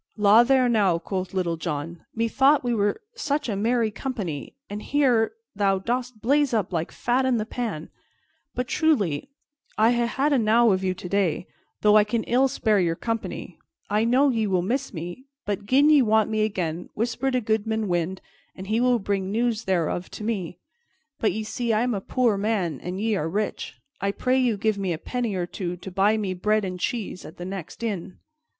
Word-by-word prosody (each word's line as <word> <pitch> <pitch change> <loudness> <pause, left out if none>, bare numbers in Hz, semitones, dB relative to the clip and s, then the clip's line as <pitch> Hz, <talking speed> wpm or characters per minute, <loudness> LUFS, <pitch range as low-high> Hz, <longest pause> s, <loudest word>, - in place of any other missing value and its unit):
"La 210 +2 +7
there, 255 +1 +4
now!" 205 -7 +3
quoth 185 +2 -4
Little 175 -3 -1
John. 160 +1 -4
"Methought 265 +6 +3
we 245 -1 0
were 205 -2 +1
such 300 - -2
a 215 - -1
merry 225 +2 +1
company, 195 - -5
and 205 +1 -6
here 250 -4 +2 0.2
thou 195 -1 +2
dost 240 +2 -3
blaze 280 0 +3
up 195 -4 -1
like 165 -1 -2
fat 245 +2 0
in 260 -2 +2
the 215 - -1
pan. 220 -10 -4 0.7
But 250 0 -2
truly, 245 - +1 0.5
I 220 +2 +5
ha' 240 -1 +1
had 275 +5 +1
enow 230 -2 +4
of 190 0 0
you 185 -1 0
today, 180 -2 -1 0.4
though 210 0 +6
I 210 - +6
can 220 +2 -1
ill 255 +3 +3
spare 220 -6 +1
your 170 -2 +1
company. 225 +4 -4 0.3
I 210 +1 +3
know 255 +5 +4
ye 225 -4 0
will 185 -3 +1
miss 265 +8 -1
me, 175 +8 -7 0.2
but 205 0 -3
gin 280 +6 +5
ye 295 -2 +7
want 220 -2 +3
me 215 0 +2
again, 175 -5 -3
whisper 240 +4 -1
to 255 -1 +1
Goodman 220 -1 -1
Wind, 175 +1 -1 0.3
and 190 - -8
he 220 +4 0
will 250 -1 +4
bring 195 -3 -2
news 230 0 0
thereof 175 -1 0
to - - -7
me. 190 -6 -3 0.6
But 220 - +2
ye 220 - -3
see 230 +2 -2
I 215 - +2
am 245 -1 0
a 200 - -2
poor 235 -1 +1
man 195 -8 -1
and 180 +2 -5
ye 220 0 +1
are 160 -1 -2
rich. 210 +4 -3 0.2
I 200 0 -1
pray 255 +4 +1
you 240 -5 +2
give 215 -1 0
me 190 -3 -1
a - - -3
penny 235 +3 -3
or 180 -1 -1
two 175 0 -5
to 190 +2 -9
buy 200 +4 +3
me 200 -3 -2
bread 210 +3 +1
and 180 -1 -5
cheese 205 -2 -3
at 160 - -11
the 175 - -6
next 190 +3 -7
inn." 200 -5 -4
215 Hz, 200 wpm, -25 LUFS, 190-240 Hz, 0.7 s, La